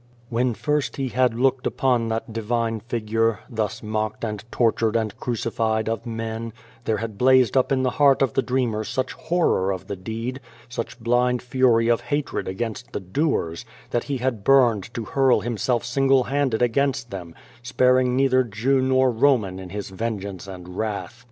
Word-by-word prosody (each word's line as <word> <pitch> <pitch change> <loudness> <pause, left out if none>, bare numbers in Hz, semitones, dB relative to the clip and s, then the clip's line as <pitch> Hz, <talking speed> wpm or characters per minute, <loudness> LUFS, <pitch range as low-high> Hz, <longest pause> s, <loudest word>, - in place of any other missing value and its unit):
When 120 0 0
first 150 +2 -1
he 135 -2 -1
had 125 -1 +2
looked 130 +1 +1
upon 125 -3 +1
that 110 0 -3
divine 115 0 -1
figure, 115 -1 -1
thus 110 -6 -3
mocked 110 0 -3
and 105 -3 -3
tortured 115 -1 +1
and 110 -2 0
crucified 110 -2 -1
of 115 +1 -3
men, 115 0 -4 0.3
there 110 - +1
had 110 -3 -5
blazed 130 -3 +5
up 130 0 +3
in 130 -1 +2
the 130 - +1
heart 140 -1 +6
of 130 - 0
the - - +2
dreamer 125 -5 -1
such 125 +4 -2
horror 165 - +1
of 95 -3 -5
the 100 - -4
deed, 115 +7 -5 0.3
such 120 0 -6
blind 120 +1 +1
fury 125 -2 +3
of 120 0 +2
hatred 145 +4 -2
against 110 +4 -4
the - - -2
doers, 95 - -1 0.3
that 120 - 0
he 140 -2 -2
had 125 -4 -2
burned 120 -7 +4
to 115 - -3
hurl 135 +1 +3
himself 120 +1 -1
single 135 +1 +3
handed 135 -3 0
against 130 +1 0
them, 85 -4 -7 0.3
sparing 125 +1 +3
neither 130 -1 +3
Jew 125 +4 +1
nor 130 0 +3
Roman 110 -7 +2
in 95 -1 -8
his 100 0 -6
vengeance 100 -2 -4
and 90 -2 -9
wrath. 110 +2 -3
115 Hz, 170 wpm, -23 LUFS, 110-130 Hz, 0.3 s, heart